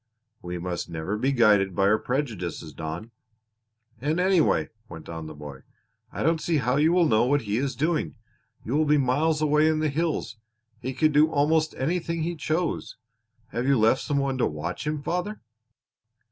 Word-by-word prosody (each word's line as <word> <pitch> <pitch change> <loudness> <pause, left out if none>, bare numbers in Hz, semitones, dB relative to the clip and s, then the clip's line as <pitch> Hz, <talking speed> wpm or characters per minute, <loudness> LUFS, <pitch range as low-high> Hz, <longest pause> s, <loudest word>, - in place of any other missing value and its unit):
"We 90 0 -5
must 85 0 -4
never 85 +4 -3
be 130 +6 0
guided 105 -7 +3
by 95 - +1
our 105 +2 +4
prejudices, 105 - -3
Don." 80 - -6 0.9
"And 150 +7 -1
anyway," 185 -3 +3 0.2
went 80 -2 -10
on 80 -1 -6
the 80 - -9
boy, 75 -2 -9 0.5
"I - - -4
don't 165 0 +2
see 165 -2 +1
how 125 -1 +1
you 155 +3 +4
will 175 -1 +4
know 110 -4 +3
what 140 +1 +2
he 105 0 -1
is 135 0 -1
doing. 155 +5 -1 0.5
You 120 - -3
will 155 +1 +3
be 150 0 +4
miles 150 +4 +1
away 150 +1 +4
in 160 0 +2
the 155 0 +1
hills. 150 -6 -2 0.4
He 130 +2 -5
could 155 +4 +3
do 150 +2 +5
almost 155 +1 +1
anything 165 +3 -1
he 170 +1 -2
chose. 160 +3 -2 0.5
Have 120 +4 -2
you 140 -1 +4
left 110 +5 +3
some 145 -2 -1
one 135 -1 -1
to - - +3
watch 85 - -5
him, 150 -1 -2
father?" 180 +6 -2
140 Hz, 185 wpm, -26 LUFS, 105-155 Hz, 0.9 s, do